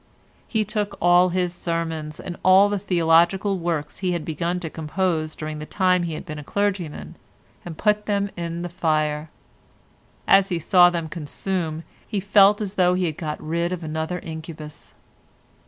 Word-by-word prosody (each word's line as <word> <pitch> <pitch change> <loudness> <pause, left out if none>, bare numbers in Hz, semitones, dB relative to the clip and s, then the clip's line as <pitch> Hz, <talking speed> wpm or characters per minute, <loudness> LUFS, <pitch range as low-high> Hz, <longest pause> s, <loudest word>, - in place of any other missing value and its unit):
He 220 -2 0
took 210 -1 -3
all 175 +1 +5
his 180 -1 -1
sermons 165 -3 -3
and 175 - -6
all 190 +2 +6
the 205 -1 -1
theological 180 +2 +2
works 165 -4 -3
he 185 -2 0
had 170 -3 -3
begun 170 +3 -2
to 165 - -3
compose 160 0 -2
during 155 0 -5
the 150 - -6
time 185 -2 +2
he 170 -2 -3
had - - -7
been 155 -3 -6
a - - -8
clergyman 195 -3 -3 0.5
and 165 -3 -8
put 210 -1 +1
them 200 -1 0
in 170 0 -4
the - - -3
fire; 155 -3 -1 1.0
as 195 0 +5
he 175 - 0
saw 175 +2 +5
them 170 -2 -3
consume 165 0 -4 0.2
he 205 - -2
felt 200 +1 +5
as 200 -2 -3
though 180 -2 +3
he 185 0 0
had 155 -3 -3
got 155 -2 -4
rid 170 +3 -2
of 180 -2 -4
another 160 +3 -3
incubus. 160 -2 -9
175 Hz, 170 wpm, -23 LUFS, 160-190 Hz, 1.0 s, all